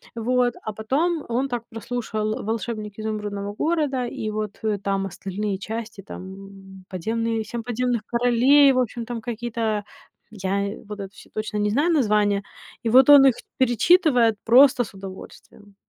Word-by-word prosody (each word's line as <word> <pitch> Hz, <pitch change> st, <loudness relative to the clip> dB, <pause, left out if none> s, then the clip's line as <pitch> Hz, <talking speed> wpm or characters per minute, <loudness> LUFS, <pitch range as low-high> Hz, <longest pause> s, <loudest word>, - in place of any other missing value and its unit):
Вот. 245 Hz, +1 st, +1 dB
А 215 Hz, -, -4 dB
потом 300 Hz, +10 st, -1 dB
он 255 Hz, +4 st, 0 dB
так 240 Hz, -2 st, -3 dB
прослушал 220 Hz, -1 st, -3 dB
"Волшебник 215 Hz, -1 st, -4 dB
Изумрудного 205 Hz, -2 st, -4 dB
города", 295 Hz, -2 st, 0 dB
и 215 Hz, -2 st, -4 dB
вот, 215 Hz, -1 st, -4 dB
э, 215 Hz, -2 st, 0 dB
там 195 Hz, 0 st, -1 dB
остальные 195 Hz, +2 st, -4 dB
части, 220 Hz, -1 st, -6 dB
там 195 Hz, 0 st, -11 dB
подземные 225 Hz, +4 st, -2 dB
"Семь 230 Hz, +2 st, -6 dB
подземных 245 Hz, -1 st, -1 dB
королей", 245 Hz, +4 st, +5 dB
в 255 Hz, -, +1 dB
общем, 240 Hz, -1 st, -2 dB
там 235 Hz, -1 st, -5 dB
какие-то 225 Hz, -2 st, -2 dB, 0.5 s
я 200 Hz, 0 st, -2 dB, 0.2 s
вот 210 Hz, 0 st, -7 dB
это 195 Hz, 0 st, -8 dB
всё -, -, -16 dB
точно 215 Hz, 0 st, -4 dB
не 210 Hz, 0 st, +1 dB
знаю 290 Hz, +10 st, +2 dB
названия. 210 Hz, -7 st, +2 dB, 0.4 s
И 230 Hz, -, 0 dB
вот 260 Hz, +4 st, +6 dB
он 285 Hz, -1 st, +9 dB
их 260 Hz, -, +3 dB, 0.2 s
перечитывает 250 Hz, -, +4 dB
просто 250 Hz, +2 st, +6 dB
с -, -, -13 dB
удовольствием. 195 Hz, +1 st, -12 dB
220 Hz, 150 wpm, -23 LUFS, 205-245 Hz, 0.5 s, он